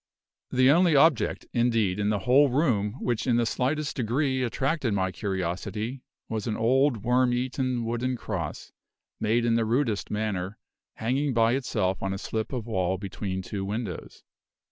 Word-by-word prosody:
The 130 +1 +4
only 170 0 +4
object, 145 -2 +3
indeed, 115 -5 +1
in 105 0 +1
the 105 - +1
whole 135 +3 +5
room 120 -7 +1
which 120 +1 -1
in 120 - +3
the 120 0 +2
slightest 145 +6 -1
degree 130 +3 0
attracted 130 -1 0
my 95 -1 0
curiosity 100 +6 -3 0.3
was 110 -1 -3
an 110 - -1
old 125 -1 +2
worm 125 +1 +3
eaten 125 -1 -1
wooden 120 +2 -1
cross, - - -5 0.5
made 115 +2 +1
in 115 - +2
the 115 0 +2
rudest 115 -2 0
manner, 105 -2 -2 0.4
hanging 130 +4 -1
by 115 0 +4
itself 95 -8 -1
on 95 0 -1
a - - -3
slip 110 +2 -3
of 125 -5 -3
wall 95 -4 0
between 95 0 -4
two 100 0 -4
windows. 100 -2 -5
115 Hz, 160 wpm, -27 LUFS, 105-130 Hz, 0.5 s, whole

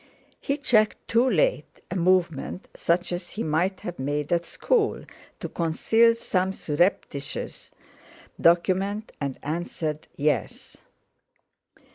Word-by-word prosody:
He 280 - -1
checked, 225 -7 +2
too 235 +3 +3
late, - - +1
a - - -2
movement 180 -2 +1
such 175 +2 0
as 175 0 -4
he 225 - -4
might 175 +5 0
have 175 -4 -6
made 145 +3 -1
at 170 -1 0
school 450 -4 0 0.3
to - - -4
conceal 225 +8 +3
some 190 -4 0
surreptitious 150 -4 -2 0.7
document, 190 +5 +2
and 140 -2 -2
answered: 155 -1 -3
"Yes." 150 +1 -1
175 Hz, 110 wpm, -26 LUFS, 160-215 Hz, 0.7 s, too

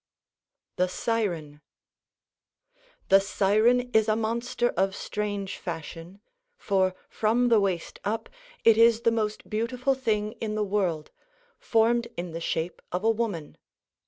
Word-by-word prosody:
THE 180 - +2
SIREN 175 -10 -2 1.5
The 195 - +7
siren 220 +6 +2
is 220 0 +4
a 215 - +3
monster 235 +2 -1
of 195 0 0
strange 205 -2 -4
fashion, 165 +2 -7 0.4
for 190 - +1
from 235 +3 +1
the 230 -2 +5
waist 190 -4 -2
up 215 +3 -2 0.4
it 225 -1 +6
is 230 0 +5
the 230 -1 +3
most 215 -2 -2
beautiful 245 +5 0
thing 215 -5 -1
in 215 -1 -2
the 215 -1 0
world, 185 -7 -1 0.5
formed 235 +1 +2
in 175 0 -4
the 165 +1 -6
shape 165 +1 -3
of 180 +3 -2
a 225 - +4
woman. 210 -9 -3
210 Hz, 130 wpm, -27 LUFS, 185-230 Hz, 1.5 s, The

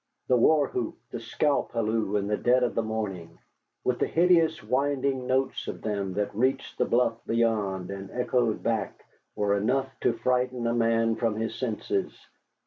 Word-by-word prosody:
The 130 - +5
war 145 +4 +4
whoop, 120 -3 -3
the 120 - -4
scalp 140 +5 0
halloo 110 -2 0
in 100 -1 +1
the 105 +1 0
dead 125 +3 +3
of 125 - 0
the - - +1
morning, 100 -7 -4 0.5
with 125 -1 0
the - - +1
hideous 165 -2 +3
winding 135 +2 0
notes 130 +1 0
of - - -6
them 100 -3 -2
that 105 0 -1
reached 130 +5 -1
the - - +3
bluff 115 -1 +1
beyond 105 -5 0
and 100 0 -7
echoed 125 -2 0
back, 115 -2 -2 0.3
were 100 -1 +1
enough 130 +6 +1
to - - +2
frighten 125 +1 0
a 115 - +1
man 115 -1 +2
from 115 -2 0
his 110 +1 -2
senses. 135 - -2
115 Hz, 170 wpm, -27 LUFS, 105-130 Hz, 0.5 s, The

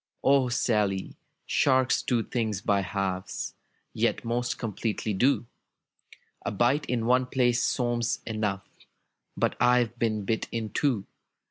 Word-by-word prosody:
'^O 135 -2 +4
Sally, 105 -5 0 0.3
sharks 130 -2 +3
do 120 -3 0
things 110 -5 -2
by 100 0 +1
halves. 95 0 -3 0.4
Yet - - 0
most 120 +1 -1
completely 110 -1 -2
do! 125 +6 +2 1.0
A - - -1
bite 120 +8 +1
in 115 -2 -1
one 125 +1 +3
place 120 -2 +2
seems 120 -2 0
enough. 105 -3 -2 0.7
But - - +1
I've 125 -1 +3
been 110 -3 0
bit 110 +2 -1
in 110 -2 -3
two. 125 -9 0
115 Hz, 125 wpm, -27 LUFS, 105-125 Hz, 1.0 s, ^O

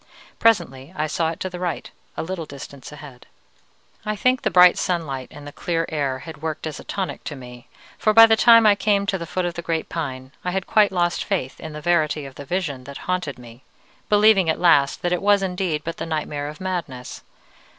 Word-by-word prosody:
Presently 170 -11 +1
I 155 - 0
saw 160 +1 -1
it 165 - -6
to 185 - -2
the 180 - -7
right, 180 -2 -4 0.3
a - - -2
little 170 -2 -5
distance 140 0 -10
ahead. 145 -4 -12 0.8
"I 215 0 -2
think 255 +5 +2
the - - +1
bright 180 0 +6
sunlight 145 -8 -2
and 145 - -12
the 145 - -8
clear 165 +2 -2
air 140 -4 -1
had 160 -3 -10
worked 160 -1 -4
as 155 -2 -5
a - - -10
tonic 195 -2 -4
to 150 - -5
me, 125 -2 -12 0.3
for 215 - +3
by 225 +1 +9
the 225 0 +4
time 230 0 +7
I 210 - +7
came 200 -1 +1
to 195 -1 -1
the 170 - -6
foot 185 +2 -2
of 175 - -2
the 170 - -5
great 165 -1 -2
pine, 130 -5 -5
I 180 - -1
had 190 +1 -2
quite 210 -2 +4
lost 175 -2 0
faith 185 -10 -3
in 160 -1 -8
the 150 - -7
verity 155 -3 +1
of 135 - -9
the 140 - -10
vision 150 -7 -3
that 140 0 -8
haunted 180 -7 -2
me, 120 0 -13 0.5
believing 205 -4 +5
at 160 - 0
last 145 -6 +3
that 175 0 +1
it 180 - -1
was 200 0 +3
indeed 180 -5 -2
but 165 - -5
the - - -5
nightmare 150 -2 -3
of 150 +1 -8
madness. 170 -10 -5
165 Hz, 225 wpm, -22 LUFS, 145-185 Hz, 0.8 s, by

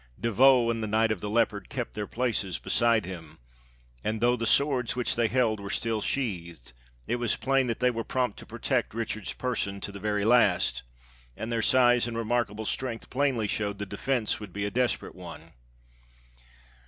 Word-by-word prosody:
De 115 - -1
Vaux 125 +1 +5
and 115 -1 -3
the 110 - -2
Knight 110 +1 +2
of 110 - -1
the 105 - -3
Leopard 105 -3 0
kept 125 -3 -4
their 105 -1 -4
places 110 -6 -1
beside 115 -3 +2
him; 85 -5 -9 0.7
and 110 0 -1
though 120 +2 +3
the 115 -1 -2
swords 135 -2 +2
which 125 -1 0
they 115 -1 +2
held 115 -3 +1
were 100 0 -7
still 110 +1 -1
sheathed, 85 - -3 0.3
it 120 - -1
was 120 -2 +1
plain 135 -1 +1
that 115 - -2
they 125 0 +3
were 115 -1 -3
prompt 125 -4 -1
to - - -11
protect - - -1
Richard's 110 -2 -3
person 105 -6 -2
to 100 - -5
the 100 - -9
very 105 0 -1
last, 110 -6 +3 0.6
and 110 +1 -4
their 115 -1 0
size 120 -1 +4
and 115 -1 -4
remarkable 110 -2 -1
strength 120 0 -3
plainly 130 -4 +1
showed 100 -1 -2
the 105 - -4
defense 110 +4 -1
would 105 -3 -9
be 100 0 -2
a 105 - -2
desperate 125 +2 0
one. 80 -3 -11
115 Hz, 190 wpm, -28 LUFS, 105-120 Hz, 0.7 s, Vaux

